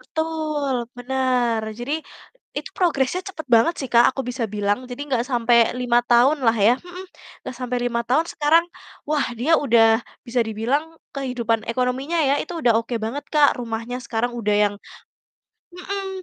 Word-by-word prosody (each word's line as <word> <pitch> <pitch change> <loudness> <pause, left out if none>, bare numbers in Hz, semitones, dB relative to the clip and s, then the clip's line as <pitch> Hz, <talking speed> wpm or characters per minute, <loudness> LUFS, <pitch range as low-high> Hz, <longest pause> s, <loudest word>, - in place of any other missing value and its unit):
Betul 305 -5 -2
bener, 250 -3 0 0.2
jadi, 290 +6 -3 0.5
itu - - -4
progresnya 345 -1 +1
cepet 325 -5 -7
banget 230 +9 +5
sih 265 - -5
Kak, 235 0 +7
aku 270 - -3
bisa 245 -2 -2
bilang, 205 +4 -1
jadi 245 +3 -6
gak 245 -1 +1
sampai 235 -2 +3
5 245 -1 +2
tahun 250 +6 +4
lah 225 0 +4
ya 215 +3 +4
mhm, 360 +1 -10 0.4
gak 260 - -6
sampai 250 -1 -3
5 235 -1 0
tahun 275 +8 +2
sekarang, 310 +3 +3 0.5
wah 300 -2 +1
dia 320 +7 +3
udah 225 -4 +4 0.3
bisa 240 +1 0
dibilang 255 +9 -2 0.2
kehidupan 235 -4 -1
ekonominya 255 +7 -1
ya, 280 - +3
itu 350 - -5
udah 235 - +4
oke 235 +1 -5
banget 240 +7 -4
Kak, 295 -3 +4
rumahnya 230 +1 -4
sekarang 240 +1 -1
udah 210 -2 +1
yang - - -9 1.0
mhm, 390 +2 -5
250 Hz, 160 wpm, -22 LUFS, 235-295 Hz, 1.0 s, Kak